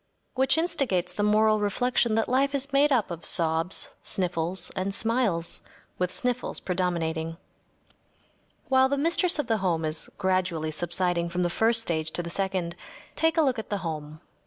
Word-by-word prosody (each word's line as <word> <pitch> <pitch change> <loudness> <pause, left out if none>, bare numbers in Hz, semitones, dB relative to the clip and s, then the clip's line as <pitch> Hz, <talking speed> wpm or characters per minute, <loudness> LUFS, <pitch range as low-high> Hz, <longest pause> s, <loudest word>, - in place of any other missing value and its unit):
Which 265 +3 +2
instigates 270 - 0
the - - -3
moral 215 +1 +4
reflection 230 +2 +1
that 225 - +1
life 275 +3 +2
is 280 +1 -1
made 285 +2 +4
up 230 -8 +2
of 170 -1 -6
sobs, 165 +2 +2
sniffles, 180 0 -2
and 195 +1 -3
smiles, 225 -8 +1 0.4
with 180 0 0
sniffles 250 -1 -2
predominating. 165 -3 -2 1.3
While 265 0 +4
the 280 - 0
mistress 340 +4 +1
of 295 - -1
the 225 -2 +1
home 170 -5 0
is 155 0 -3
gradually 185 -5 0
subsiding 170 +1 +1
from 180 +1 -1
the 175 - 0
first 225 +4 +2
stage 160 -5 -1
to 175 - -2
the 170 - -6
second, 185 -3 -1 0.4
take 325 +1 +1
a 320 - +5
look 260 -5 +1
at 220 - -7
the 205 - -1
home. 155 -1 -5
190 Hz, 165 wpm, -27 LUFS, 170-250 Hz, 1.3 s, a